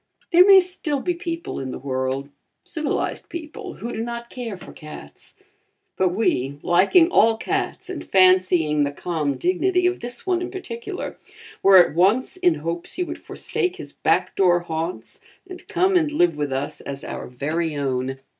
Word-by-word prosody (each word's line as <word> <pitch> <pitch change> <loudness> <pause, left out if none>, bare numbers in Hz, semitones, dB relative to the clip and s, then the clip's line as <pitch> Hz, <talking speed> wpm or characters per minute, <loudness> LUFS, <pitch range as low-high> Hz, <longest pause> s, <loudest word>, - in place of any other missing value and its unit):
There 360 +2 +7
may 390 -1 +9
still 355 -6 -2
be 355 +6 -1
people 335 -1 -5
in 135 -1 -5
the - - -5
world 130 +1 -3 0.3
civilized 310 -3 -3
people 345 +4 -7
who 235 - -6
do - - -3
not 235 0 -6
care 235 -6 -5
for - - -12
cats, 150 - -12 0.6
but 185 -1 +2
we, 145 - 0
liking 195 - +4
all 225 -8 +4
cats - - -3
and 370 -3 -6
fancying 185 -5 +4
the 140 - -1
calm 150 -2 -2
dignity 355 - +1
of 365 +1 +1
this 240 0 -6
one 365 -2 +1
in 355 - -3
particular, 370 -1 -6 0.4
were 195 -1 +7
at 175 - +6
once 195 - +2
in 360 -2 +2
hopes 170 +2 -4
he 360 - 0
would 330 -1 -7
forsake 365 0 -2
his - - -10
back - - 0
door 175 -2 +4
haunts 165 +1 -5 0.3
and 365 -1 -11
come 375 +2 +2
and 315 -4 +3
live 175 - +2
with 145 -2 -2
us 135 +2 -3
as 140 0 -6
our - - -6
very 155 +5 -2
own. 135 -1 -2
195 Hz, 175 wpm, -22 LUFS, -, 0.6 s, may